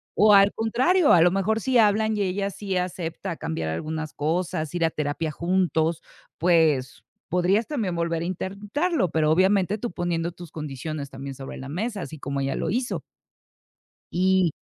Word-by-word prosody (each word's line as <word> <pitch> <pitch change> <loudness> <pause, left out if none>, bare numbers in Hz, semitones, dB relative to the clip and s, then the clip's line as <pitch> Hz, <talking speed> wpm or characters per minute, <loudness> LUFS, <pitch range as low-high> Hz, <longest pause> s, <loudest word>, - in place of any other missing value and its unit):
O 210 0 +6
al 200 0 +7
contrario, 260 - +3
a 170 - +6
lo 175 +1 +5
mejor, 205 +4 0
si 260 +2 +2
hablan 215 0 +3
y 205 - +1
ella 195 +2 -1
sí 195 0 -4
acepta 180 -1 -3
cambiar 80 +1 -3
algunas 155 - -4
cosas, 160 +1 -2
ir 175 - 0
a 165 - +4
terapia 155 +1 -2
juntos, 170 -1 0 0.4
pues, 160 -7 +2 0.3
podrías 185 +5 +2
también 220 - -2
volver 170 -1 -1
a - - -3
intentarlo, 200 - -1
pero, 155 -1 +2
obviamente, 190 +3 +3
tú 240 +3 -4
poniendo 170 -1 -2
tus 175 -2 -11
condiciones 150 -1 -5
también 135 0 -7
sobre 135 0 -8
la 135 - -8
mesa, 205 +6 -3
así 155 -3 -7
como 140 0 -3
ella 135 0 -1
lo - - -2
hizo. 245 +4 -1 1.1
Y 185 -1 +3
175 Hz, 170 wpm, -25 LUFS, 155-200 Hz, 1.1 s, al